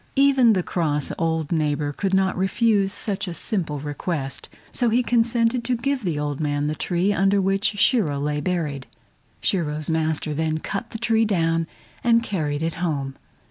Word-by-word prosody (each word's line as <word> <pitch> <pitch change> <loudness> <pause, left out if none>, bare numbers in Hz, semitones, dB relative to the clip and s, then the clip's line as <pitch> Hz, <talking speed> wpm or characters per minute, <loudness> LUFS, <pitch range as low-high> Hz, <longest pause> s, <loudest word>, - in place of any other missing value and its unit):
Even 270 -4 +5
the 185 -3 0
cross 150 -6 -1
old 160 -1 -1
neighbor 150 -2 0
could 195 +5 -2
not 190 -1 +2
refuse 195 +1 +2
such 200 -1 -2
a 175 - -4
simple 165 -10 -1
request, 145 -1 -4 0.2
so 240 -2 +2
he 240 +3 +2
consented 235 0 +2
to 250 0 0
give 270 +1 -1
the 170 -5 -1
old 145 -1 -2
man 145 -1 -1
the 150 - 0
tree 180 +5 0
under 195 0 +3
which 195 +2 +1
Shiro 195 - +3
lay 150 +1 -1
buried. 150 -6 -2 0.5
Shiro's 155 -4 0
master 155 -1 0
then 155 +1 -1
cut 200 +7 -4
the 225 - -6
tree 225 -1 +2
down 165 -5 +1 0.4
and 230 -1 +4
carried 155 -8 -2
it 165 0 -1
home. 140 -6 -2
175 Hz, 170 wpm, -23 LUFS, 150-215 Hz, 0.5 s, Even